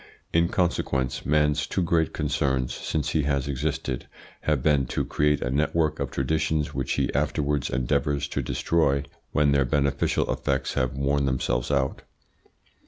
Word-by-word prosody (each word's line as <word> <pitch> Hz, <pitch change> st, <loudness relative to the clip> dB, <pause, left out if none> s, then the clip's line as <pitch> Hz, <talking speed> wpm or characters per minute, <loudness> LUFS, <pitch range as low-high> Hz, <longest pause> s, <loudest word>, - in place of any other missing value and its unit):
In 85 Hz, +1 st, +4 dB
consequence 70 Hz, -9 st, -1 dB
man's 75 Hz, 0 st, +2 dB
two 95 Hz, -, 0 dB
great 85 Hz, -3 st, +1 dB
concerns 65 Hz, -2 st, 0 dB
since 75 Hz, -2 st, -2 dB
he 80 Hz, -, +1 dB
has 70 Hz, -2 st, 0 dB
existed 70 Hz, -1 st, -2 dB, 0.3 s
have 75 Hz, -4 st, 0 dB
been 70 Hz, -4 st, +3 dB
to -, -, -1 dB
create 75 Hz, 0 st, +1 dB
a 60 Hz, -, -2 dB
network 75 Hz, +2 st, +1 dB
of 70 Hz, -2 st, -2 dB
traditions 80 Hz, +3 st, 0 dB
which -, -, -1 dB
he -, -, 0 dB
afterwards 75 Hz, -1 st, 0 dB
endeavours 70 Hz, +3 st, 0 dB
to -, -, -1 dB
destroy 70 Hz, -5 st, +1 dB, 0.3 s
when 75 Hz, -1 st, +3 dB
their 70 Hz, -1 st, +4 dB
beneficial 70 Hz, +1 st, +1 dB
effects -, -, -1 dB
have 65 Hz, +1 st, -1 dB
worn 70 Hz, 0 st, +1 dB
themselves 65 Hz, -2 st, 0 dB
out. 70 Hz, -2 st, 0 dB
70 Hz, 150 wpm, -26 LUFS, 65-75 Hz, 0.3 s, In